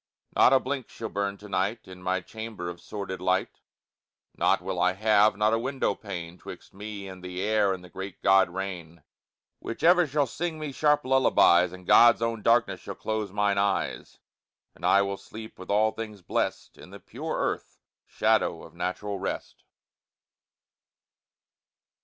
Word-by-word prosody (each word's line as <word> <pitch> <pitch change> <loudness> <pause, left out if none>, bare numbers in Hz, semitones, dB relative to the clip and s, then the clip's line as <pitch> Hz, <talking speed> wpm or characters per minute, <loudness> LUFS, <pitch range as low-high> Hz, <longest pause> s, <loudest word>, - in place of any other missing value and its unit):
Not - - +6
a 135 - +6
blink 130 -1 -4
shall 110 - -6
burn 100 0 -2
to 105 - -12
night 100 +4 -2
In 90 -1 -11
my 95 +1 -1
chamber, 110 -4 -6
of 85 - -13
sordid 95 -3 -6
light; 95 +1 0 0.8
Nought - - +2
will - - -3
I 90 0 +3
have, 105 0 +3
not 105 +1 +2
a 115 - +2
window 130 +3 -1
pane, 90 -4 -7
'Twixt - - -11
me 100 0 -7
and 95 -1 -10
the 90 0 -6
air 105 0 +2
and 95 -1 -4
the 90 - -13
great 95 0 -7
good 95 -1 +5
rain, 90 -3 -6 0.6
Which 115 - -7
ever 175 0 +6
shall 145 +1 +1
sing 160 +6 -4
me 155 -2 -5
sharp 150 +1 +2
lullabies; 90 -9 +4
And 90 0 -11
God's 115 +3 +6
own 115 -1 -1
darkness 115 +3 +2
shall - - -7
close 110 -2 -3
mine 100 0 +1
eyes; 100 -1 -1 0.6
And - - -3
I 100 - +5
will 100 0 -3
sleep, 110 0 -11
with 95 - -10
all 110 +2 +3
things 110 -3 -8
blest, - - -2
In - - -12
the - - -11
pure - - -5
earth - - -3 0.3
shadow - - +1
of - - -13
natural 95 +3 -3
rest. 95 - -5
100 Hz, 170 wpm, -27 LUFS, 95-115 Hz, 0.8 s, Not